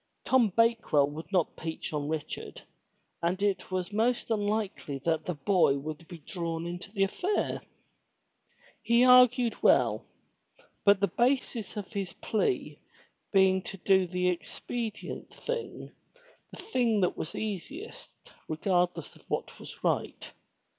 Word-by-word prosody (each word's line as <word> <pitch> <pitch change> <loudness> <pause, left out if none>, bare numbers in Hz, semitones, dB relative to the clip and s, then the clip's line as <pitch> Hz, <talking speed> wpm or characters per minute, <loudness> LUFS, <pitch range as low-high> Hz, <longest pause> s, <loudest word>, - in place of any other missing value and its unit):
Tom 255 -4 +4
Bakewell 225 -9 +3
would 160 +5 -8
not 180 -5 +1
peach 160 -1 -5
on 145 -1 -2
Richard 155 -2 -5 0.6
and 175 +3 0
it 200 -2 0
was 185 +1 -3
most 235 +2 +1
unlikely 205 -8 -1
that 160 -2 +1
the 180 - -2
boy 150 -2 +3
would 155 +3 -7
be 175 - -9
drawn 165 +1 -4
into 175 +3 -6
the 200 -2 +1
affair. 360 - -1 1.2
He 235 +1 +4
argued 250 -1 +6
well, - - +4 0.8
but 200 -1 +6
the 200 - +4
basis 240 -4 0
of 205 +1 -6
his 195 -4 -3
plea 230 - -1 0.5
being 190 -1 +4
to 195 - -8
do 190 0 +3
the 180 +1 +1
expedient 220 +5 -5
thing, 475 -1 -5 0.6
the - - -12
thing 245 - +1
that 180 - +1
was 160 - -5
easiest 220 - -7
regardless 175 0 0
of - - -18
what - - -3
was - - -11
right. - - -1
195 Hz, 135 wpm, -29 LUFS, 170-230 Hz, 1.2 s, argued